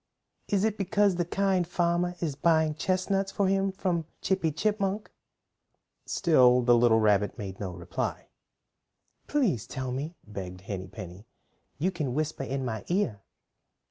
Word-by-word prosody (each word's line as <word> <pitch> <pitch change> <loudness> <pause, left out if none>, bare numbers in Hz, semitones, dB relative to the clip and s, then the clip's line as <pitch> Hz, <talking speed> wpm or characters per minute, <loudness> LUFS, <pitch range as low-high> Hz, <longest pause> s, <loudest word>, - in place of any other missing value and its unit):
"Is 200 -1 +1
it 220 -1 0
because 200 -1 +2
the 175 - +1
Kind 190 -1 +1
Farmer 175 0 0
is 160 -4 -1
buying 160 +1 +3
chestnuts 190 +4 0
for 200 - +1
him 195 0 +2
from 175 -4 -1
Chippy 190 -4 +1
Chipmunk?" 205 +4 -1 1.0
Still 125 -8 +4
the 120 0 +5
little 115 -1 +5
rabbit 105 -2 +2
made 95 -2 -6
no 100 - -3
reply. 85 -1 -4 1.0
"Please 220 - +1
tell 130 -1 -4
me," 145 +7 -4
begged 90 -3 -7
Henny 95 -1 -5
Penny. 95 +1 -10 0.5
"You 175 +7 +1
can 150 -8 -3
whisper 155 -1 -1
in 135 0 -2
my 110 -4 -3
ear." 170 - 0
160 Hz, 140 wpm, -28 LUFS, 115-190 Hz, 1.0 s, the